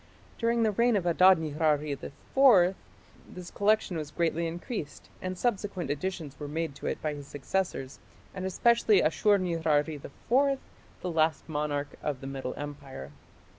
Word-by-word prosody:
During 230 0 +2
the 220 - +3
reign 235 +3 +3
of 190 -4 0
Adad 180 +2 +6
nirari 150 -1 0
IV 135 - -8 1.2
this 180 -1 -9
collection 205 -3 +1
was 155 -2 -4
greatly 170 0 0
increased, 170 - -6
and 185 0 -4
subsequent 195 - -1
additions 150 -2 -4
were 145 - -5
made 160 +1 -3
to - - -5
it - - -2
by 155 -1 -1
his 145 -1 -9
successors, 145 -2 -3 0.3
and 185 - -5
especially 215 +1 +3
Ashur 205 +6 +3
nirari 160 -4 0
IV, 270 - +1 0.4
the 180 - -3
last 160 -1 +1
monarch 145 -2 -2
of 145 -4 -2
the 135 - -9
Middle 135 -1 -5
Empire. 140 - -7
165 Hz, 150 wpm, -29 LUFS, 145-190 Hz, 1.2 s, Adad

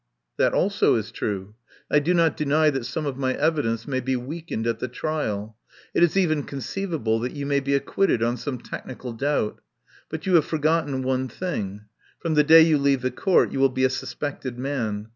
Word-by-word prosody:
"That - - +2
also - - +3
is - - -2
true. 100 0 -4 0.4
I 150 - +5
do 170 +5 +1
not 165 -2 +3
deny 155 0 +3
that 135 -4 -3
some 155 - -3
of 140 -2 -3
my 130 -1 0
evidence 140 -8 0
may 130 -2 -1
be 130 +1 -1
weakened 130 -2 -4
at 115 -1 -1
the 125 - -2
trial. 115 -6 -3 0.4
It - - +2
is 175 +2 +4
even 155 -6 +2
conceivable 140 - -2
that 125 +2 -3
you 140 -1 -4
may 140 0 +2
be 140 0 0
ac 140 - 0
quitted 195 -12 +1
on 120 +1 +1
some 140 -1 -4
technical 125 -1 -7
doubt. 135 -2 -1 0.5
But 160 0 -6
you 190 - +1
have 160 -4 +5
forgotten 155 -3 0
one 130 0 0
thing. 105 - -4 0.3
From 165 -2 -2
the 150 -1 +5
day 160 +2 +8
you 160 -2 +4
leave 140 -2 +2
the 130 - 0
Court 185 +8 +2
you - - -3
will 135 0 +5
be 130 0 -1
a 130 - +4
suspected 130 -2 -5
man. 115 -6 -3
140 Hz, 205 wpm, -24 LUFS, 125-155 Hz, 0.5 s, day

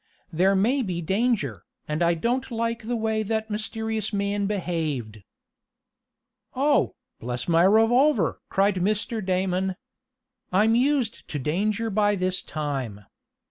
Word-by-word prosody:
"There 190 +4 +3
may 240 +8 +2
be 185 -7 -2
danger, 180 - 0 0.2
and 150 +2 -2
I 170 0 +3
don't 245 +10 -1
like 230 -1 -2
the 240 - 0
way 220 -1 0
that 220 +1 -2
mysterious 220 0 -3
man 200 0 -1
behaved." 155 - -3 1.3
"Oh, 285 +3 +2 0.2
bless 125 0 -4
my 170 0 +4
revolver!" 225 - +4
cried 195 0 +2
Mr. 210 +3 -1
Damon. 185 0 0 0.8
"I'm 210 +5 +4
used 255 -1 +1
to 150 - -4
danger 205 - -1
by 205 0 +2
this 185 -1 -1
time. 135 -10 -4
200 Hz, 125 wpm, -25 LUFS, 170-225 Hz, 1.3 s, my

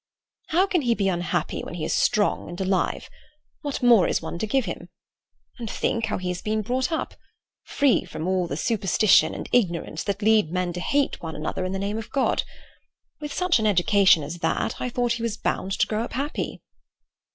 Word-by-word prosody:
"How 360 +4 +3
can 365 -4 +1
he 240 -3 +2
be 200 -3 0
unhappy 175 -1 -2
when - - -7
he 160 -3 -3
is - - -1
strong 210 -8 +1
and 175 +2 -7
alive? 190 -1 0 0.5
What 285 -3 -4
more 235 -6 +6
is - - +1
one 170 - -6
to 220 - -2
give 265 +2 +1
him? 175 -1 -6 0.7
And 230 -2 -5
think 230 +1 -1
how - - -1
he 185 -1 -4
has 180 0 -3
been 215 0 -1
brought 255 +5 -1
up—free 285 -3 -2
from 155 +2 -5
all 185 -1 +1
the 140 - -4
superstition 210 0 +3
and - - -6
ignorance 175 -8 0
that 200 +1 -2
lead 215 -5 +4
men 180 -1 -1
to 180 - -4
hate 280 +9 0
one 160 -2 -6
another 155 +4 -3
in 185 - -3
the 195 - -2
name 200 +3 -2
of 225 - -8
God. 275 - +1 0.8
With 295 -1 -6
such 360 -4 +2
an 215 - +1
education 190 -3 +4
as 160 +4 -6
that, - - -1
I 250 - -1
thought 245 0 0
he 235 - -4
was 230 -2 -2
bound 195 - -2
to - - +2
grow 215 0 -2
up - - -7
happy." 280 +4 -3
210 Hz, 205 wpm, -24 LUFS, 180-245 Hz, 0.8 s, more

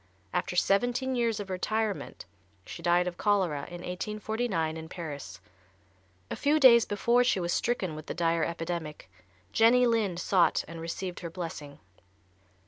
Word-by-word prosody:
After - - -1
seventeen 245 +8 +1
years 230 -3 0
of 200 -2 -6
retirement, 215 - -2 0.4
she - - -8
died 175 +1 +3
of 175 -1 -5
cholera 185 -9 +1
in 175 -1 -8
1849, 205 -2 -2
in 160 0 -8
Paris. 145 - -7 0.9
A - - -1
few 300 +2 +2
days 235 -4 +7
before 235 +4 +2
she 245 -6 +2
was 175 -1 -1
stricken 200 -8 -1
with 155 0 -9
the - - -4
dire 165 -1 +1
epidemic 165 - -4 0.4
Jenny 245 +3 +5
Lind 215 -7 +1
sought 180 -1 +2
and 165 +1 -8
received 175 +2 -5
her 170 - -6
blessing. 160 -5 -7
180 Hz, 145 wpm, -29 LUFS, 165-225 Hz, 0.9 s, days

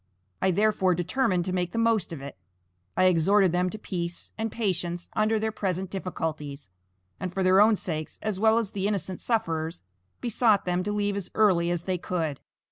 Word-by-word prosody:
I, 190 - +3
therefore, 190 -1 +2
determined 180 0 0
to 185 - -2
make 180 -1 -1
the - - -3
most 230 -6 +2
of 150 -5 -6
it. 140 - -7 0.6
I - - +4
exhorted 185 +2 +4
them 180 +1 +1
to 215 - -6
peace 175 -4 -3
and 220 0 -3
patience 175 -5 -2
under 215 +1 +2
their 220 +1 -1
present 190 -3 -2
difficulties, 155 - -4 0.5
and 185 - -3
for 190 +1 -1
their 185 +2 +6
own 215 +1 +6
sakes 155 -5 -4
as 215 -3 -3
well 220 +1 +4
as 225 -4 0
the 195 0 -1
innocent 190 -3 -2
sufferers, 165 -7 -1 0.4
besought 225 -3 +2
them 180 0 0
to 210 - -1
leave 205 -1 0
as 200 -3 -4
early 185 -6 +4
as 175 -1 -1
they 185 -1 -1
could. 160 -6 -2
185 Hz, 190 wpm, -27 LUFS, 175-210 Hz, 0.6 s, their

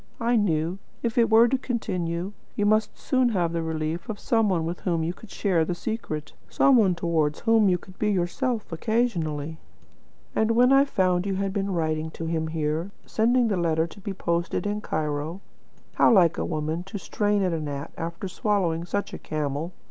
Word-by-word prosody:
I 235 +1 +2
knew, 175 -3 +1 0.2
if 230 -2 -1
it 235 -1 +4
were 225 +2 +7
to 265 +2 0
continue, 185 -7 -2 0.2
you 205 - +1
must 215 +1 +2
soon 255 -2 +2
have 175 -6 0
the 170 - -1
relief 160 +2 -3
of 210 -2 -4
some 225 -3 +2
one 170 -4 +1
with 170 +2 -4
whom 170 -3 0
to 225 - -14
share 185 -4 +1
the 175 +2 -2
secret, 175 -8 -4 0.2
some 275 -1 +4
one 200 -7 +4
towards 160 -3 0
whom 225 -3 +4
you 180 - +3
could 185 +1 -16
be 210 - +1
yourself 210 +5 -1
occasionally. 165 -7 -1 0.8
And 220 +1 +2
when 250 +3 +5
I 275 +1 +6
found 185 -7 +1
you 195 - 0
had 195 0 -1
been 200 -1 -1
writing 160 -2 -1
to 165 - -4
him 160 -1 -1
here, 160 +2 -2 0.2
sending 240 +2 +2
the 200 -4 0
letter 165 -2 +1
to 170 - -12
be 200 +1 -4
posted 170 -1 -1
in 205 +1 -1
Cairo 155 0 -2 0.5
(how - - +5
like 175 -6 +5
a - - -1
woman, 155 +1 -2
to 195 +2 -6
strain 205 +3 0
at 180 -2 +1
a 165 - -1
gnat, 145 0 -5
after 170 +3 -5
swallowing 180 -4 0
such 200 +3 -3
a - - -6
camel!) 150 +2 -3
180 Hz, 195 wpm, -26 LUFS, 160-215 Hz, 0.8 s, were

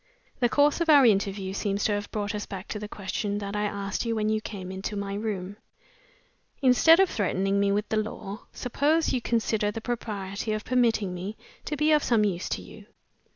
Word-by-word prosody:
"The 240 -3 +3
course 290 +5 +3
of 335 - 0
our 285 -4 +8
interview 195 -3 +1
seems 200 0 -1
to - - +2
have 205 0 -3
brought 205 0 -3
us 210 -1 -4
back 190 -1 -7
to 210 - -4
the 210 - -6
question 205 0 -3
that 200 0 -4
I 210 0 0
asked 200 -1 -2
you 230 -1 -1
when 215 -1 0
you 215 0 +1
came 190 -4 -7
into 190 +2 -4
my 200 -1 -3
room. 205 -2 -4 1.0
Instead 285 +6 +6
of 385 - +6
threatening 195 - 0
me 200 0 +2
with 205 +1 0
the 220 - 0
law, 215 -1 -5
suppose 295 +6 +1
you 250 - 0
consider 220 -3 0
the 210 - -4
propriety 215 -3 -3
of 215 -1 -4
permitting 230 -6 +2
me 190 +4 -6 0.3
to 300 - -3
be 300 +2 +3
of 300 -1 +5
some 225 -3 +3
use 180 -3 -2
to - - -3
you. - - -13
210 Hz, 205 wpm, -27 LUFS, 200-235 Hz, 1.0 s, our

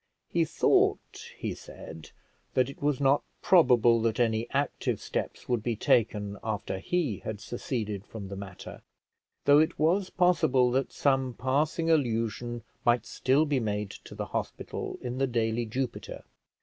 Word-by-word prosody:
He - - +2
thought, - - +1
he - - -3
said, 80 -1 -11 0.5
that 130 0 +3
it - - -16
was 145 -2 +1
not 140 0 +4 0.2
probable 120 - +5
that 115 0 0
any 115 0 +1
active 140 +1 -1
steps - - -4
would 120 -3 +1
be 115 +1 -1
taken 105 -2 +1
after 105 -3 -3
he 145 - -1
had 110 -2 -5
seceded 110 -3 -4
from 105 -3 -7
the 100 - -6
matter, 95 -2 -9 0.6
though 145 +1 +7
it 160 +2 +2
was 180 +5 +2
possible 160 -9 +3
that 135 +1 0
some 135 -3 +1
passing 150 +6 +1
allusion 120 -4 0 0.2
might 120 0 +3
still 135 +4 +2
be 145 -3 +1
made 105 -3 -2
to - - -11
the - - -3
hospital - - -4
in 125 +1 -4
the 135 - +2
daily 115 -1 0
Jupiter. 125 +2 -4
120 Hz, 150 wpm, -28 LUFS, 110-140 Hz, 0.6 s, though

